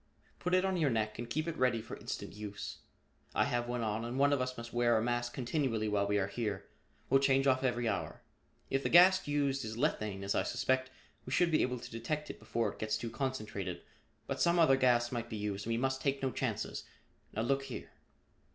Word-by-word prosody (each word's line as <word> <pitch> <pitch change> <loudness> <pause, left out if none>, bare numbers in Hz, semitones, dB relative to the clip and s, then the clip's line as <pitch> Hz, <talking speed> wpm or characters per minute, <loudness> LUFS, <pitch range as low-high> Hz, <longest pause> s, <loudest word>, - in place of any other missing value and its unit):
"Put 180 +1 +1
it 185 +1 +3
on 190 -1 +1
your 155 -4 +3
neck 110 -2 -1
and 120 0 -5
keep 155 +5 -1
it 165 - -2
ready 125 -3 +3
for 110 - -7
instant - - -6
use. 105 0 -6 0.6
I - - +4
have 120 0 -1
one 120 -1 -2
on 110 +1 -1
and 120 +2 -4
one 140 +1 +4
of 140 - +1
us 130 0 -3
must 115 0 -8
wear 120 -1 +3
a - - +2
mask 120 0 0
continually 125 -4 0
while 100 -1 +1
we 105 0 +2
are 100 - +2
here. 100 -1 -3 0.4
We'll 135 - +5
change 135 0 +3
off 130 -1 +3
every 120 -2 +1
hour. - - -3 0.5
If 135 - +2
the - - -1
gas 185 +1 +7
used 140 -2 +1
is 110 0 -5
lethane, 110 -8 -1
as 100 - 0
I - - +2
suspect, 130 0 0 0.3
we 130 - -8
should 175 +4 +3
be 155 - +4
able 125 0 0
to 120 - -9
detect 150 +7 -3
it - - -14
before 115 0 -1
its - - -11
gets 110 0 0
too 115 +1 -5
concentrated, 110 -10 -3 0.4
but - - -3
some 170 0 +4
other 160 -6 +6
gas 120 -2 +3
might 120 -1 -3
be 110 - -4
used 105 0 -3
and - - -1
we 115 - +1
must 130 +2 0
take 140 -1 0
no 130 - +1
chances. - - -2 0.5
Now 110 - 0
look 135 +2 +1
here." - - -7
120 Hz, 230 wpm, -33 LUFS, 110-135 Hz, 0.6 s, gas